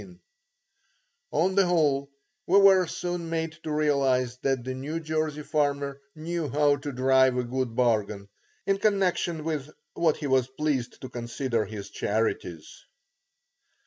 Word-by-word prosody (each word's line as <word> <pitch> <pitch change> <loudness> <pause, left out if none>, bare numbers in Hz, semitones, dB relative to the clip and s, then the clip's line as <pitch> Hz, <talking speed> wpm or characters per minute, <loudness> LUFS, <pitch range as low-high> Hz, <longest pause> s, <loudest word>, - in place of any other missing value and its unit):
On 180 +5 +1
the 195 -1 +4
whole, 145 -5 +2 0.4
we 190 - +5
were 190 -2 +6
soon 175 0 -4
made 165 -1 -2
to 155 - -5
realize 135 -5 +1
that 135 -2 0
the 130 +1 -4
New 145 +5 -4
Jersey 155 -1 -2
farmer 140 -2 -1
knew 160 -1 -3
how 145 +2 +3
to 145 +1 -5
drive 130 0 +3
a 125 - +1
good 125 -1 -3
bargain, 105 -5 0 0.4
in 195 0 +1
connection 185 -6 +1
with 155 -3 -3 0.2
what 165 -3 +2
he 150 - -6
was 130 -2 +2
pleased 135 -2 -2
to 130 - -7
consider 120 -1 -2
his 105 -1 -8
charities. 100 -6 -3
145 Hz, 140 wpm, -27 LUFS, 130-160 Hz, 0.4 s, were